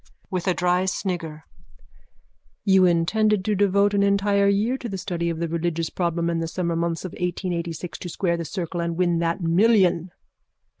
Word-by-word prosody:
(With 185 0 -2
a 180 - +2
dry 180 +1 +1
snigger.) 170 -5 -3 1.2
You 190 -2 +5
intended 190 +4 +2
to 215 - +1
devote 200 0 +2
an 200 - +2
entire 200 0 +2
year 205 +5 +2
to 235 - -5
the 195 - -4
study 170 -2 -2
of 165 - -3
the 170 +1 -2
religious 165 0 -2
problem 170 -1 -1
and 165 -1 -1
the 165 - -2
summer 170 0 -2
months 165 +1 -2
of 185 - -5
1886 175 -1 -4
to 175 - -6
square 170 0 0
the 170 - -4
circle 175 0 -4
and 170 -1 -2
win 175 -2 +2
that 170 +2 -1
million. 180 0 +3
180 Hz, 180 wpm, -24 LUFS, 170-195 Hz, 1.2 s, You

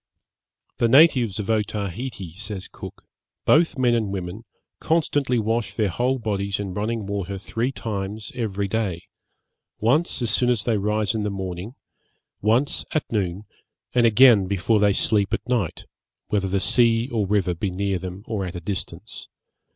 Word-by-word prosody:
'The 120 - +4
natives 130 - +5
of 100 - -3
Otaheite,' 105 -3 -2
says 105 -2 -6
Cook, - - -10 0.4
'both 160 -1 +4
men 125 -2 +3
and 110 -3 +1
women, 95 +3 -5 0.3
constantly 145 -6 +1
wash 110 -2 -1
their 105 -2 +1
whole 125 +9 0
bodies 100 -3 -2
in 100 -2 -4
running 110 +2 -2
water 100 -1 -3
three 115 +6 -2
times 105 -3 -5
every 100 -4 -2
day; 95 -5 -2 0.8
once 140 +10 +2
as 115 - +1
soon 125 +3 +3
as 120 -5 +1
they 115 - +1
rise 105 +1 0
in 110 - -1
the 105 - -1
morning, 95 +3 -5 0.7
once 115 +7 +2
at 155 - +2
noon, 100 -3 -1 0.5
and 120 -1 +5
again 115 -3 +6
before 100 +3 +1
they 100 0 +4
sleep 100 0 +1
at - - -9
night, 120 -9 -1 0.4
whether 100 -2 +1
the 95 +1 0
sea 115 +2 +3
or 110 -5 0
river 95 -3 +1
be 90 +4 -2
near 95 0 -1
them 95 +2 -7
or 110 -4 -2
at 90 -2 -5
a - - -3
distance. 95 +3 -6
105 Hz, 160 wpm, -23 LUFS, 95-115 Hz, 0.8 s, again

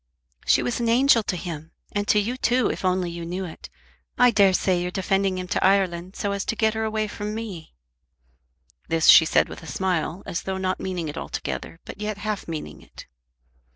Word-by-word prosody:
"She - - +4
was 245 - -2
an 235 -1 0
angel 245 0 +5
to 195 - -3
him, 165 -2 -7 0.2
and 205 0 -2
to - - +4
you 215 +5 0
too, 250 -1 +2
if - - -6
you 185 - +2
only 180 -2 -2
knew 180 +3 -4
it. 165 - -10 0.5
I 245 0 +6
dare 200 -3 +5
say 185 -1 +1
you're 180 0 -3
sending 195 0 +1
him 185 0 -4
to - - 0
Ireland 185 -2 +1
so 200 - -2
as 200 -1 -2
to - - -1
get 220 0 +2
her 220 0 -2
away 220 0 -1
from 210 0 -5
me." 200 - -7 1.1
This 165 -1 +1
she 160 - +9
said - - +3
with - - -10
a 165 - -11
smile, 180 +3 -2
as 170 - -3
though 190 0 -3
not 185 0 -1
meaning 180 -4 -3
it 150 - -5
altogether, 165 - -5
but 205 - -9
yet 210 -1 -3
half 210 0 -4
meaning 160 -2 -6
it. - - -13
190 Hz, 210 wpm, -24 LUFS, 175-215 Hz, 1.1 s, she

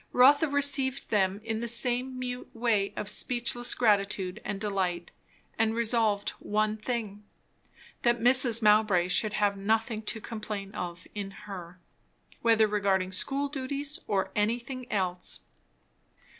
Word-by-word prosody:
Rotha 285 +5 +6
received 275 -2 +1
them 195 -2 +1
in 220 -1 -3
the 235 - -3
same 250 +2 0
mute 250 0 -5
way 225 -4 +1
of 210 - -4
speechless 240 +3 +1
gratitude 200 -3 +1
and 200 - -4
delight; 185 -4 -2 0.5
and 225 0 +2
resolved 225 -3 +1
one 215 +1 0
thing; 215 -2 -4 0.8
that 240 0 +2
Mrs. 245 -1 +5
Mowbray 210 -4 +4
should 210 +3 +1
have 205 -1 +1
nothing 220 +2 0
to 220 +1 -4
complain 210 -3 -6
of 175 -1 -6
in 205 -1 -5 0.2
her, 180 -3 -9 0.6
whether 225 -1 +4
regarding 195 -3 0
school 275 +9 0
duties 280 +1 -4
or 190 -1 0
anything 240 +4 -2
else. 185 -3 -1
220 Hz, 130 wpm, -28 LUFS, 200-245 Hz, 0.8 s, Rotha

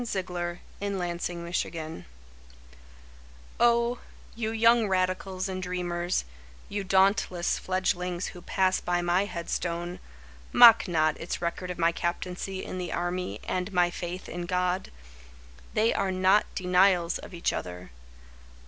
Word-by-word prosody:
Captain 175 -2 -3 0.2
Orlando 180 -4 -2 0.3
Killion 160 - -3 1.5
Oh, 235 0 +3 0.4
you 220 -1 -2
young 230 0 +4
radicals 185 0 -1
and 185 -1 -4
dreamers, 180 -1 -2 0.4
You 200 0 -3
dauntless 190 -2 +2
fledglings 180 -1 -1
Who 175 - -11
pass 185 +1 +1
by 175 0 0
my 175 +3 +2
headstone, 175 -1 -3 0.5
Mock 230 -3 +8
not 155 -3 +1
its 165 - -3
record 175 +1 -3
of 180 - -4
my 170 0 +3
captaincy 180 +2 -3
in 185 - -5
the 180 - -4
army 180 +1 -3
And 180 +2 -2
my 175 -1 +3
faith 175 +1 -6
in 175 0 -5
God! 180 +1 0 0.9
They 220 +2 +3
are 195 -2 0
not 185 +3 +3
denials 180 -2 +3
of - - -10
each 170 - 0
other. 90 -4 -6
180 Hz, 125 wpm, -28 LUFS, 175-190 Hz, 1.5 s, Mock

